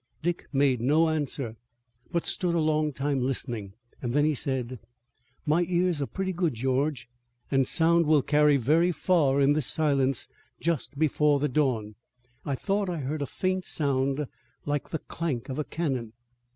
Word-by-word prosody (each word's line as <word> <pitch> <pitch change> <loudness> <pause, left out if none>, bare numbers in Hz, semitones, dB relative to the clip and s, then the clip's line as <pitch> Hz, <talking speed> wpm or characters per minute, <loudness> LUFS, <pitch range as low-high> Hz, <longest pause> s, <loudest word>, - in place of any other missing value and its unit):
Dick 175 +1 -2
made 135 -4 +2
no 155 +6 +3
answer, 140 -7 -3 0.5
but 170 -2 -1
stood 175 -3 0
a - - +2
long 155 -1 +1
time 140 0 -1
listening. 120 -6 -3 0.3
Then 135 +4 +1
he 155 - +2
said: 130 -3 -3 0.7
"My 155 +4 +3
ears 175 -3 +1
are 140 - -1
pretty 190 -1 -3
good, 170 -6 0
George, 130 +3 0 0.4
and 135 -1 +3
sound 170 -1 +3
will 150 -3 +4
carry 150 0 +4
very 160 +8 +3
far 150 -4 +2
in 140 +1 +5
this 150 -3 +1
silence 140 -4 +1 0.3
just 155 -3 -2
before 150 -1 +3
the 150 +1 0
dawn. 125 -7 0 0.5
I 140 - -1
thought 195 +6 -1
I 175 - -2
heard 145 +3 -3
a 140 - -1
faint 185 +4 -1
sound 140 0 0 0.4
like 145 -1 -2
the 160 - -2
clank 145 -6 -4
of 130 - -3
a - - +1
cannon." 135 -9 -3
145 Hz, 165 wpm, -27 LUFS, 135-160 Hz, 0.7 s, in